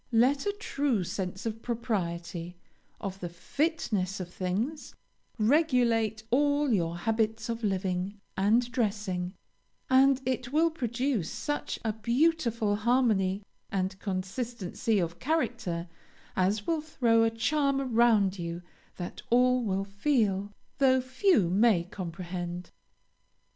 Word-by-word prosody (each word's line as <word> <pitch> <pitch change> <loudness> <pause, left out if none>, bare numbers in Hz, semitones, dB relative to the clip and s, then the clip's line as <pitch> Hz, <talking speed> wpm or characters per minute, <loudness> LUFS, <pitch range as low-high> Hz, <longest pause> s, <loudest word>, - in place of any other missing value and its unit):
Let 265 - +3
a 405 - +1
true 275 - 0
sense 185 +2 -4
of 225 0 -3
propriety, 175 -7 -3 0.4
of 195 -1 -5
the 175 - -4
fitness 205 - -1
of 180 -1 -6
things, 215 +12 -3 0.4
regulate 230 -4 +2
all 285 0 +3
your 170 -3 0
habits 220 +3 0
of 230 0 -3
living 190 0 -1 0.2
and 225 +6 +2
dressing, 200 -6 -1 0.6
and 265 0 +6
it 255 -1 -2
will 325 +3 +3
produce 245 - -1
such 295 -1 -3
a 220 - +1
beautiful 235 -3 +1
harmony 210 -4 +2 0.3
and 190 0 -1
consistency 205 +2 -2
of 170 -3 -1
character 235 - -1 0.5
as 200 +3 +1
will 325 -2 0
throw 240 -7 +2
a 225 - +4
charm 275 +4 +1
around 225 -7 +3
you 170 +1 -4 0.3
that 175 -1 -6
all 250 +1 +4
will 195 -2 -1
feel, 205 -2 0 0.3
though 260 -1 +5
few 255 - +2
may 195 0 +4
comprehend. 175 -1 -6
220 Hz, 115 wpm, -29 LUFS, 190-255 Hz, 0.6 s, and